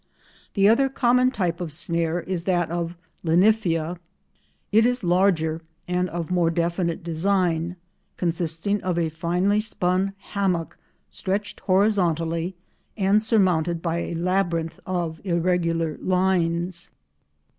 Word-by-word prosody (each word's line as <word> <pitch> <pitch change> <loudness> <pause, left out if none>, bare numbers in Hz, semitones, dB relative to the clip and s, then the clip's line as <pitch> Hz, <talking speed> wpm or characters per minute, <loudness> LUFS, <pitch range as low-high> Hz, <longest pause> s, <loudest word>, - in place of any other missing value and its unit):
The 200 -1 +5
other 270 +5 +4
common 250 -1 +3
type 180 -8 -2
of 170 -3 -4
snare 170 +2 -1
is 175 -2 -4
that 175 -3 +1
of 170 0 -3 0.3
Linyphia. 175 -2 +2 0.7
It 220 +2 +5
is 245 -1 +1
larger 175 -3 +2 0.3
and 180 0 0
of 170 0 -4
more 175 -2 +3
definite 170 +1 -1
design, 175 0 0 0.4
consisting 170 +3 -1
of 180 -2 -1
a 165 -2 +1
finely 175 +5 +1
spun 195 -2 0 0.2
hammock 185 -5 -1 0.4
stretched 200 +2 -3
horizontally, 180 -3 +1 0.4
and 200 +1 +3
surmounted 180 -7 +1
by 170 -1 0
a 170 - -4
labyrinth 170 -2 -1
of 170 -3 -2
irregular 170 -3 0
lines. 180 -2 0
175 Hz, 115 wpm, -24 LUFS, 165-195 Hz, 0.7 s, The